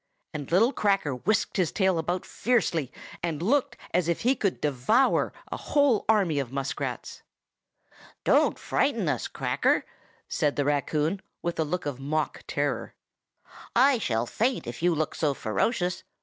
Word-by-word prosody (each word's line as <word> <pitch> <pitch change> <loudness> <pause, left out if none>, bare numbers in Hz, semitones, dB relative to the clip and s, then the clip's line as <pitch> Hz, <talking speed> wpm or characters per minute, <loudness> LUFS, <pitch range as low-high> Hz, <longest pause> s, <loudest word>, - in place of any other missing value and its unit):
and 145 -2 -6
little 225 +10 +4
Cracker 195 -8 +1
whisked 210 - 0
his 180 -4 +1
tail 190 -4 +2
about 175 +3 -2
fiercely, 175 - 0 0.3
and 165 -3 -2
looked 255 - +1 0.2
as 175 -1 +2
if 170 - 0
he 255 +3 +3
could 195 -7 -1
devour 150 - +2 0.2
a - - -2
whole 285 -7 +2
army 190 -9 +3
of 130 -3 -3
muskrats. 135 0 -4 1.0
"Don't - - +3
frighten - - 0
us, - - -1
Cracker!" - - +1 0.4
said 145 -1 0
the 145 - 0
raccoon, 150 +5 0 0.2
with 170 -1 -2
a - - +4
look 175 +4 -3
of 140 -3 -3
mock 150 +2 -2
terror. - - -2 0.8
"I 260 +1 +5
shall 115 - 0
faint 240 - -1
if 120 +4 -7
you 175 -1 +3
look 155 0 -1
so 145 -3 0
ferocious. 180 - -1
170 Hz, 150 wpm, -27 LUFS, 145-215 Hz, 1.0 s, I